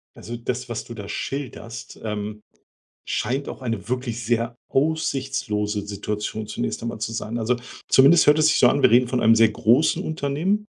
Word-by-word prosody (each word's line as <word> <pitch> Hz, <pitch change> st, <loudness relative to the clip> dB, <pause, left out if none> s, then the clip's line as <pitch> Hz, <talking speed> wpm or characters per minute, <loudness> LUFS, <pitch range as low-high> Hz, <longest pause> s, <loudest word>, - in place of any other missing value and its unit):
Also, 120 Hz, -, -7 dB
das, 125 Hz, +1 st, -4 dB
was 120 Hz, -, -4 dB
du 120 Hz, -, -8 dB
da 105 Hz, -3 st, -8 dB
schilderst, 115 Hz, -1 st, -6 dB
ähm, 105 Hz, 0 st, -4 dB, 0.7 s
scheint 130 Hz, +5 st, -2 dB
auch -, -, -8 dB
eine 115 Hz, -5 st, -3 dB
wirklich 125 Hz, -2 st, -3 dB
sehr 120 Hz, +1 st, 0 dB
aussichtslose 135 Hz, -8 st, -1 dB
Situation 105 Hz, +1 st, -4 dB
zunächst 120 Hz, +2 st, -3 dB
einmal 115 Hz, -1 st, -4 dB
zu 115 Hz, +1 st, -3 dB
sein. 110 Hz, +1 st, -4 dB
Also, 120 Hz, +2 st, +1 dB, 0.3 s
zumindest 140 Hz, +6 st, +6 dB
hört 150 Hz, +1 st, +6 dB
es 155 Hz, 0 st, +5 dB
sich 150 Hz, -, +3 dB
so 125 Hz, -, +6 dB
an. 140 Hz, +2 st, +1 dB
Wir -, -, +6 dB
reden 125 Hz, +1 st, +5 dB
von 125 Hz, 0 st, 0 dB
einem 115 Hz, +1 st, +6 dB
sehr 115 Hz, 0 st, +6 dB
großen 115 Hz, +7 st, +2 dB
Unternehmen, 160 Hz, +7 st, -1 dB
120 Hz, 180 wpm, -23 LUFS, 110-135 Hz, 0.7 s, zumindest